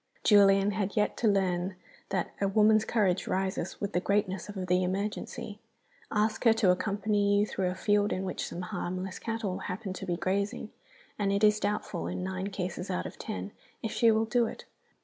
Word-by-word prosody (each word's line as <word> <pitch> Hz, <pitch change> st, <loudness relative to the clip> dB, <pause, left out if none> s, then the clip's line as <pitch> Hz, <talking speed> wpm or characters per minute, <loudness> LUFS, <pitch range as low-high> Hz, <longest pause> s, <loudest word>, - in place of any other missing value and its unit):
Julian 200 Hz, -1 st, +6 dB
had 200 Hz, -1 st, -2 dB
yet 210 Hz, -, +2 dB
to 230 Hz, -, +1 dB
learn 185 Hz, -2 st, +1 dB, 0.3 s
that 190 Hz, -3 st, -1 dB
a 200 Hz, -, +3 dB
woman's 215 Hz, +2 st, +4 dB
courage 195 Hz, -5 st, +1 dB
rises 190 Hz, -1 st, -2 dB
with 200 Hz, 0 st, -3 dB
the -, -, +2 dB
greatness 195 Hz, -1 st, 0 dB
of 190 Hz, -3 st, -4 dB
the 180 Hz, 0 st, +2 dB
emergency. 200 Hz, +2 st, -3 dB, 0.5 s
Ask 215 Hz, +1 st, 0 dB
her 230 Hz, -, +7 dB
to 210 Hz, -5 st, +4 dB
accompany 205 Hz, +2 st, +1 dB
you 205 Hz, -, +3 dB
through 190 Hz, -3 st, -1 dB
a 180 Hz, -, -3 dB
field 205 Hz, +1 st, +2 dB
in 185 Hz, -, -1 dB
which 190 Hz, -, -3 dB
some 175 Hz, -, -6 dB
harmless 185 Hz, +1 st, -4 dB
cattle 225 Hz, -5 st, -3 dB
happen 190 Hz, +1 st, -4 dB
to 195 Hz, +1 st, -7 dB
be 175 Hz, -1 st, -1 dB
grazing, 200 Hz, +5 st, -2 dB, 0.5 s
and 200 Hz, -1 st, +1 dB
it 200 Hz, +1 st, 0 dB
is 210 Hz, 0 st, +5 dB
doubtful, 205 Hz, -4 st, -2 dB
in -, -, -3 dB
nine 190 Hz, +1 st, -3 dB
cases 185 Hz, -2 st, -4 dB
out 90 Hz, -, -2 dB
of -, -, -8 dB
ten, 95 Hz, +2 st, -5 dB, 0.3 s
if 225 Hz, -, -2 dB
she 230 Hz, -, +4 dB
will 220 Hz, 0 st, +3 dB
do 235 Hz, +1 st, +2 dB
it. -, -, -8 dB
200 Hz, 190 wpm, -29 LUFS, 185-210 Hz, 0.5 s, her